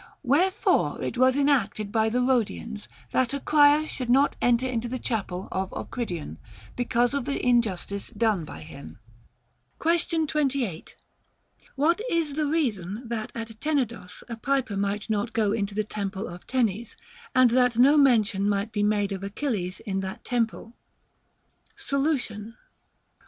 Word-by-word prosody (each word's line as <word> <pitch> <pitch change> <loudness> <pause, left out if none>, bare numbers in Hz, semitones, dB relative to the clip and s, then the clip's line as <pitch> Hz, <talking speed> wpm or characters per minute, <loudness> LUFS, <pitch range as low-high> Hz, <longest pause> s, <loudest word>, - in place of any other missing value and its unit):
Wherefore 360 - +2
it - - -3
was 255 +2 +4
enacted 230 -8 +1
by 220 0 +2
the 245 +3 +1
Rhodians 230 -3 -1 0.2
that 260 +1 +1
a - - -2
crier 295 +1 +5
should 250 -5 -5
not 270 +3 +4
enter 245 +1 +3
into 240 -2 -2
the 255 +2 -3
chapel 195 -7 -3
of 190 0 -2
Ocridion, 175 - -5 0.4
because 245 0 +1
of 280 -3 -1
the 280 - -2
injustice 205 -5 0
done 215 -7 0
by 80 - -9
him. 80 +1 -11 0.8
Question 330 -1 +1
28. 275 - -2 0.8
What 325 +8 +2
is 330 -4 0
the 300 0 0
reason 230 - -2
that 225 -2 -3
at 225 -1 -7
Tenedos 245 -11 -2
a 230 -2 -6
piper 265 -3 0
might 200 +1 -2
not 220 +1 -1
go 215 -3 +2
into 205 -2 -2
the 215 - +1
temple 200 -2 -4
of 175 +1 -10
Tenes, 235 -3 -1 0.4
and 255 -2 +6
that 250 -1 +3
no 270 +5 +6
mention 220 -8 +3
might 200 +2 -1
be 210 -1 -1
made 205 -1 +1
of 195 0 -4
x\chilles 200 -3 -3
in 195 -4 -3
that 195 +4 -6
temple? 230 -1 -2 1.0
Solution. 245 -7 -2
230 Hz, 145 wpm, -26 LUFS, 205-270 Hz, 1.0 s, and